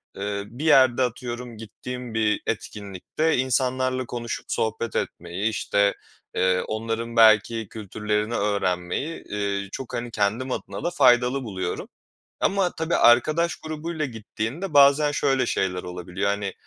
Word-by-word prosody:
eee, 100 0 -3
bir 130 +7 -7
yerde 130 -4 +5
atıyorum 120 -1 -4
gittiğim 125 +2 -7
bir 110 -1 +1
etkinlikte 105 - -2
insanlarla 130 0 +1
konuşup 120 -1 -5
sohbet 110 0 -2
etmeyi, 90 +6 -2
işte, 100 -1 +1 0.4
eee, 95 0 +2
onların 115 +2 -3
belki 110 0 +5
kültürlerini 105 +1 -2
öğrenmeyi, 100 - -1
eee, 100 -1 -3
çok 130 - -7
hani 120 0 -3
kendim 110 +6 0
adına - - -5
da 175 - +1
faydalı 125 -3 +4
buluyorum 95 -5 -4 0.5
ama 190 -2 +2
tabii 160 +1 -1
arkadaş 155 +8 +4
grubuyla 155 0 -4
gittiğinde 120 - -5
bazen 145 +1 +6
şöyle 135 -3 +1
şeyler 90 -4 -1
olabiliyor. 90 +2 -3
Hani 100 -1 -2
115 Hz, 125 wpm, -24 LUFS, 100-130 Hz, 0.5 s, bazen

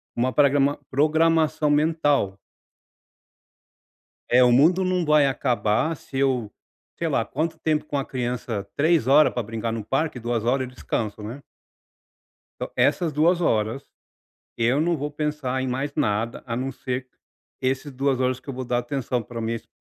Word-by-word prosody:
Uma 125 +2 0
prégrama 140 0 +3
programação 155 +1 +2
mental. 145 -9 +2 1.9
É, 125 +1 +6
o 125 - +5
mundo 165 +9 +4
não 185 -1 +1
vai 150 -2 +4
acabar 125 +2 0
se 135 -1 -8
eu 130 -6 +1 0.5
sei - - -1
lá - - +1
quanto 160 +3 -3
tempo 155 -1 0
com 150 - -4
a 135 - -1
criança, 120 -5 -3
3 155 -3 +3
horas 150 +3 +6
para 120 - -2
brincar 115 +1 -4
no 115 -2 -4
parque, 135 +2 -1
2 120 -1 -2
horas 130 +1 +1
descanso, 110 -4 -4
né? 120 +7 -7 1.2
Então, - - -4
essas 170 -3 +2
2 170 +4 +3
horas, 115 -2 0 0.7
eu 120 +5 +2
não 170 +1 +1
vou 145 0 -4
pensar 150 -3 -2
em 130 - -2
mais 135 +3 -3
nada, 110 +2 -1
a 115 - -3
não 130 +2 -2
ser 130 0 -4 0.5
esses 135 +3 -1
2 135 0 0
horas 130 0 +1
que - - -22
eu 135 - -4
vou 130 0 -4
dar 120 0 0
atenção 130 -2 -2
para 115 +1 -7
minhas 115 0 -3
135 Hz, 160 wpm, -24 LUFS, 120-150 Hz, 1.9 s, É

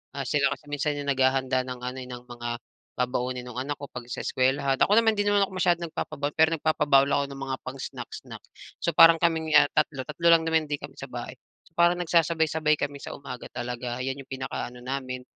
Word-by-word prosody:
Ah 140 -1 -3
sila 140 +2 +2
kasi - - -14
minsan 145 0 -1
yung 145 - -5
naghahanda 130 -1 +2
ng 125 -1 -6
ano 125 +1 -5
eh, - - -10
ng 125 -1 -8
mga 120 -1 -6 0.5
babaunin 125 0 -1
nung 125 0 -6
anak 145 +2 -4
ko 140 - -7
'pag 125 -1 -7
sa - - -4
eskuwelahan. 135 +1 +1
Ako 205 - +5
naman 225 -1 +3
'di 205 - +1
naman 205 -1 +4
ako - - -15
masyadong 175 -2 +1
nagpapabaon, 150 -2 -4
pero 160 0 +5
nagpapabaon 145 -3 +3
lang - - +2
ako - - -9
ng 135 0 -8
mga 130 - -1
pang 130 +1 -7
snack-snack. - - -8 0.4
So - - +2
parang 165 0 +8
kaming 160 -2 +1
ah - - +8
3, 150 -3 0
3 165 +3 -1
lang 165 -1 +6
naman 160 -1 +2
din 145 -1 -2
kami - - -9
sa - - -6
bahay. - - -6 0.3
So - - -23
parang 175 +1 +5
nagsasabay-sabay 160 -2 +2
kami 145 0 -3
sa - - -7
umaga 130 -3 -8
talaga. 120 0 -4
Yan 135 +1 -3
yung 135 - -16
pinaka 130 0 -4
ano 125 0 -13
namin, 130 -1 -4
140 Hz, 225 wpm, -26 LUFS, 130-160 Hz, 0.5 s, parang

